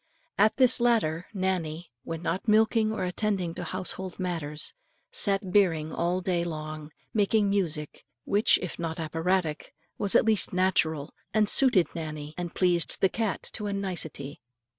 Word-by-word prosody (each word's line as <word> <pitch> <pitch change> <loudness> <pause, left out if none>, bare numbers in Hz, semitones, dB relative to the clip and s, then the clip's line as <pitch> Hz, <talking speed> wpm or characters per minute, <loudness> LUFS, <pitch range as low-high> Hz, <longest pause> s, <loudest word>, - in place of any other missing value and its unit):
At 215 +2 +4
this 255 -1 +6
latter, 210 -9 +1
Nannie, 175 - -3
when 165 +1 -6
not 175 +6 -2
milking 220 0 +3
or 220 - -3
attending 185 -2 -1
to 175 - -6
household 185 +1 -4
matters, 165 -5 -2 0.4
sat 200 - +1
birring 165 -6 +2
all 175 +2 0
day 180 -2 0
long, 155 -2 -6 0.2
making 205 -1 +2
music 160 -7 -2 0.2
which, 205 +2 +4
if 180 - -6
not 165 -1 -4
operatic, 165 0 -1 0.2
was 200 - 0
at - - +5
least 220 -4 +3
natural, 160 -5 +1 0.2
and 215 -1 +4
suited 245 -8 +5
Nannie 155 -2 -6
and 175 -1 -6
pleased 175 -2 +2
the 190 - +3
cat 220 -1 -2
to 210 -2 -2
a 200 - -2
nicety. 160 -8 -5
180 Hz, 150 wpm, -27 LUFS, 160-205 Hz, 0.4 s, this